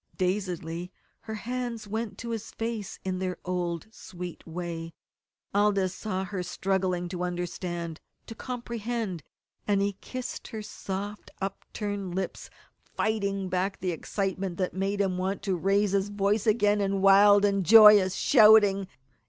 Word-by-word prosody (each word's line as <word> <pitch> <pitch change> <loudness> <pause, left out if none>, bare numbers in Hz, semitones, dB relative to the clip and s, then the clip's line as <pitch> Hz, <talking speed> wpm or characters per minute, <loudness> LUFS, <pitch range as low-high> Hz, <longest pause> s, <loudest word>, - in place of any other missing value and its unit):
Dazedly 180 -2 -2 0.4
her 220 - -2
hands 240 -1 -4
went 215 -1 -4
to 235 0 -5
his 225 -1 -4
face 225 -3 -4
in 185 -1 -2
their 185 -1 -2
old, 175 -2 -2
sweet 180 -5 -8
way. 165 -1 -5 0.6
Aldous 200 -2 +2
saw 190 -3 -3
her 190 -1 -4
struggling 180 0 -1
to 180 -1 -5
understand 175 -2 -4 0.2
to - - -8
comprehend; 235 -6 -4 0.5
and 205 -1 +3
he 200 0 +1
kissed 255 -1 -6
her 220 -1 -6
soft 205 0 -6
upturned 195 -1 -4
lips, 190 0 -4 0.3
fighting 200 -3 -2
back 185 +1 -1
the 185 - -1
excitement 190 +1 -3
that 185 -1 -1
made 195 +2 -1
him 185 -2 0
want 190 +2 -2
to 190 -2 0
raise 195 +3 +2
his 200 0 +1
voice 205 +2 0
again 210 -1 +3
in 195 -1 0
wild 200 +1 +7
and 200 -1 +1
joyous 210 -1 +8
shouting. 205 -2 +6
195 Hz, 140 wpm, -28 LUFS, 185-210 Hz, 0.6 s, joyous